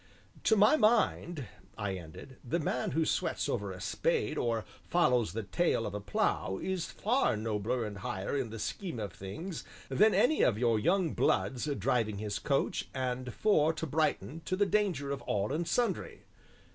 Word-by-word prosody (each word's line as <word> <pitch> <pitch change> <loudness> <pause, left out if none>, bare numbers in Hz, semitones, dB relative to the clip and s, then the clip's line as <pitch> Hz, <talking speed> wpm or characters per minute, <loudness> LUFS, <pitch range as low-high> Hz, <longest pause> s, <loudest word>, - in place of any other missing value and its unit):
"To 220 - +5
my 215 +9 +6
mind," 210 - +2 0.3
I 105 -3 -2
ended, 90 +9 -9
"the 130 +7 -1
man 145 -6 -1
who 160 +3 +1
sweats - - 0
over - - -2
a - - -8
spade 485 -3 0
or 115 -2 0 0.2
follows 125 -10 +2
the 115 +1 -3
tail 140 +1 +1
of - - -4
a 105 - -3
plough 100 -1 0
is 185 -3 -2
far 235 - +1
nobler 110 +2 -1
and 100 -2 -6
higher 95 +5 -3
in 135 -5 -1
the 115 - -7
Scheme 165 - -4
of 105 -2 -4
Things 155 - -6 0.3
than 210 +11 +4
any 310 +5 +4
of 110 - +3
your 115 -2 +2
young 175 - +2
'bloods' 130 +1 +1
driving 110 -4 +1
his 105 0 -3
coach 140 +3 0
and 125 -1 -2
four 160 - +3
to 160 - -4
Brighton 160 +1 -1
to 185 - 0
the 205 +2 +3
danger 185 -8 0
of 140 - -3
all 105 +5 -1
and 165 +2 -1
sundry." 245 -1 -1
135 Hz, 175 wpm, -31 LUFS, 110-175 Hz, 0.3 s, my